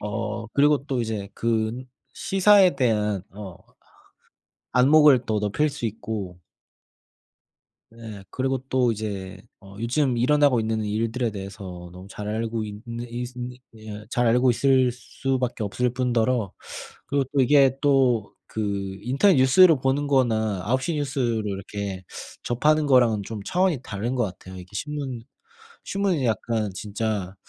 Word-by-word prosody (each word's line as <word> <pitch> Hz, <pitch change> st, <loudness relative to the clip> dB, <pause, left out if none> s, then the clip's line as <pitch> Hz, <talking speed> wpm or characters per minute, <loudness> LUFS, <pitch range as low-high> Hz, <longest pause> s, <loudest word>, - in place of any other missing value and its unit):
어 105 Hz, +2 st, -4 dB
그리고 145 Hz, +3 st, +3 dB
또 135 Hz, -4 st, -1 dB
이제 110 Hz, -3 st, -3 dB
그 115 Hz, +2 st, -1 dB, 0.3 s
시사에 195 Hz, -2 st, +4 dB
대한 105 Hz, -6 st, +1 dB
어 95 Hz, -3 st, -9 dB, 1.2 s
안목을 135 Hz, 0 st, +6 dB
또 110 Hz, -1 st, 0 dB
높일 105 Hz, +9 st, 0 dB
수 140 Hz, -4 st, -5 dB
있고 105 Hz, -4 st, -6 dB, 1.5 s
네. 115 Hz, -3 st, -10 dB
그리고 135 Hz, 0 st, -1 dB
또 125 Hz, -3 st, +2 dB
이제 100 Hz, -3 st, -5 dB, 0.2 s
어 100 Hz, 0 st, -14 dB
요즘 125 Hz, +2 st, 0 dB
일어나고 140 Hz, 0 st, +3 dB
있는 110 Hz, 0 st, -1 dB
일들에 115 Hz, +3 st, -1 dB
대해서 95 Hz, -3 st, -8 dB
너무 90 Hz, +1 st, -11 dB
잘 105 Hz, 0 st, -7 dB
알고 110 Hz, +1 st, -2 dB
있는 115 Hz, +3 st, -7 dB
있으 125 Hz, +1 st, -6 dB
네 125 Hz, 0 st, -6 dB, 0.5 s
잘 120 Hz, -1 st, +1 dB
알고 125 Hz, +2 st, +4 dB
있을 130 Hz, 0 st, +3 dB
수밖에 125 Hz, -1 st, -3 dB
없을뿐더러 120 Hz, -1 st, 0 dB, 0.5 s
그리고 140 Hz, -1 st, 0 dB
또 140 Hz, -, +3 dB
이게 135 Hz, 0 st, +4 dB
또 130 Hz, -7 st, +2 dB, 0.2 s
그 100 Hz, -3 st, -3 dB
인터넷 140 Hz, -, +3 dB
뉴스를 155 Hz, +6 st, +6 dB
보는 135 Hz, +2 st, 0 dB
거나 110 Hz, -8 st, +1 dB
9:00 130 Hz, +9 st, 0 dB
뉴스로 135 Hz, -6 st, -1 dB
이렇게 100 Hz, -1 st, -5 dB, 0.4 s
접하는 150 Hz, +5 st, +2 dB
거랑은 120 Hz, -6 st, +4 dB
좀 105 Hz, 0 st, -7 dB
차원이 180 Hz, -, +1 dB
다른 110 Hz, +5 st, -3 dB
것 125 Hz, -, +1 dB
같아요. 95 Hz, -2 st, -7 dB
이게 90 Hz, -, -9 dB
신문 135 Hz, +1 st, -5 dB, 0.6 s
신문은 195 Hz, -7 st, -1 dB
약간 110 Hz, -1 st, -1 dB
진짜 100 Hz, -1 st, -3 dB
115 Hz, 260 characters per minute, -24 LUFS, 105-135 Hz, 1.5 s, 안목을